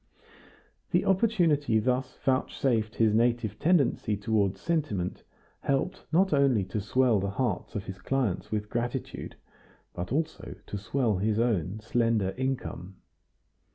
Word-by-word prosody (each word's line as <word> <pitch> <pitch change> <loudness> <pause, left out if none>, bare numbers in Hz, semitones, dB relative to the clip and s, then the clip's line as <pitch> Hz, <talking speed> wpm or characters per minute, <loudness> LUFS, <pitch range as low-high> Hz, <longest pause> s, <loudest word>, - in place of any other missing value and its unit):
The - - +2
opportunity 175 - +3
thus 125 +3 0
vouchsafed 125 -4 +1
his 110 -2 +3
native 115 -2 +1
tendency 140 - +2
toward 100 -2 +1
sentiment 110 - -2 0.4
helped 140 +7 -1
not 185 +2 +3
only 135 -7 +3
to 105 - 0
swell 120 +1 +3
the 100 +1 -1
hearts 105 -2 -2
of 100 - -2
his 95 -1 -7
clients 125 -8 -1
with 105 -1 -1
gratitude, 120 +3 -4 0.6
but 90 +3 -5
also 155 +4 -2
to 105 - -5
swell 110 0 0
his 105 +2 0
own 110 -4 0
slender 115 -4 +1
income. 130 -8 -3
115 Hz, 125 wpm, -28 LUFS, 105-135 Hz, 0.6 s, opportunity